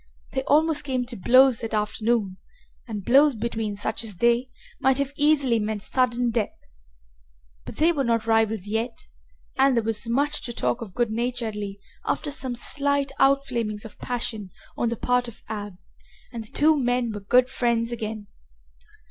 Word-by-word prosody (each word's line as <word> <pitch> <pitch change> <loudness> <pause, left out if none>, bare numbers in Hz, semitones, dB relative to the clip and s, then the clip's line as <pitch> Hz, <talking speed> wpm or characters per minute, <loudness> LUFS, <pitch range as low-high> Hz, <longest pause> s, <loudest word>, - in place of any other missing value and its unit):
They 265 - -1
almost 310 0 +3
came 260 -3 -1
to 240 0 -8
blows 255 +4 +5
that 225 -2 -3
afternoon, 210 -2 0 0.5
and 210 -4 -5
blows 275 +2 +5
between 220 -2 -3
such 205 +3 -3
as 215 -4 -6
they 235 +5 +2 0.3
might 265 0 +3
have 280 0 -1
easily 285 -6 +3
meant 210 -1 -3
sudden 245 -1 +1
death. 225 -2 -2 1.1
But - - -8
they 325 +3 +4
were 290 -5 0
not 230 -2 +1
rivals 225 -3 +2
yet 225 +3 -3 0.5
and 270 -1 +5
there 230 - +2
was 225 +1 -2
much 290 +5 +1
to 240 - -4
talk 235 - -1
of 200 -6 -8
good 240 -2 +1
naturedly, 220 -4 -3 0.2
after 295 - -2
some 260 -3 -4
slight 280 +2 +1
outflamings 255 -6 +1
of 220 - -12
passion 225 -5 -4 0.3
on 235 - 0
the 235 - -3
part 250 +1 +1
of 235 - -11
Ab, 205 -2 -5 0.6
and 230 -2 -5
the - - -12
two 310 +2 +4
men 245 -3 0
were 210 - -5
good 245 +6 +3
friends 235 -2 0
again. 220 -2 -4
235 Hz, 165 wpm, -25 LUFS, 220-265 Hz, 1.1 s, blows